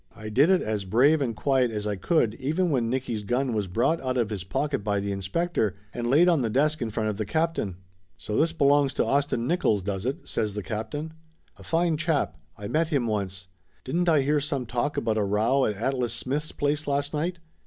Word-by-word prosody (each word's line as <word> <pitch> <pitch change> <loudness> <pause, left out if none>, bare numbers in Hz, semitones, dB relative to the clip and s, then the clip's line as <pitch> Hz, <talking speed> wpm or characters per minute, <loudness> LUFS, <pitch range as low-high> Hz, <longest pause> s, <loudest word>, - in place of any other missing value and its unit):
I 110 0 -7
did 135 +10 +4
it 190 -1 +4
as 105 -2 -2
brave 130 +11 +3
and 120 -5 -1
quiet 130 -2 +2
as 105 -2 -4
I 105 -1 -1
could 115 - +1
even 160 +6 0
when 120 -5 +1
Nicky's 120 -3 -2
gun 125 +4 0
was 105 -3 -1
brought 120 - +1
out 130 -1 -1
of 115 -3 0
his 100 -4 -3
pocket 135 +7 -2
by 100 -1 0
the 100 0 -2
inspector 100 - -1 0.2
and 120 -1 -2
laid 155 +7 +5
on 170 -5 +4
the 115 - 0
desk 150 +6 +1
in 115 - -1
front 110 0 -1
of 105 - -3
the 110 - -1
captain. 160 - -1 0.4
"So 105 - -5
this 160 +6 +3
belongs 145 -3 +3
to - - +1
Austin 140 -4 0
Nickolls, 110 - +1
does 100 +3 -3
it?" 135 - -4
says 105 -2 -2
the 105 - -3
captain. 145 +10 -4 0.4
"A - - -13
fine 165 -1 +1
chap 145 - 0 0.2
I 100 - -6
met 160 +7 +1
him 140 -7 +1
once. 95 -4 -3 0.4
Didn't 175 +6 0
I 155 -3 +4
hear 145 +2 +1
some 140 -3 -2
talk 120 +5 -2
about 110 -1 0
a - - +2
row 110 +7 +2
at 105 - -1
Atlas 125 +2 -1
Smith's 150 +4 -2
place 145 +1 -1
last 140 +1 0
night 170 +4 -1
130 Hz, 220 wpm, -26 LUFS, 105-150 Hz, 0.4 s, laid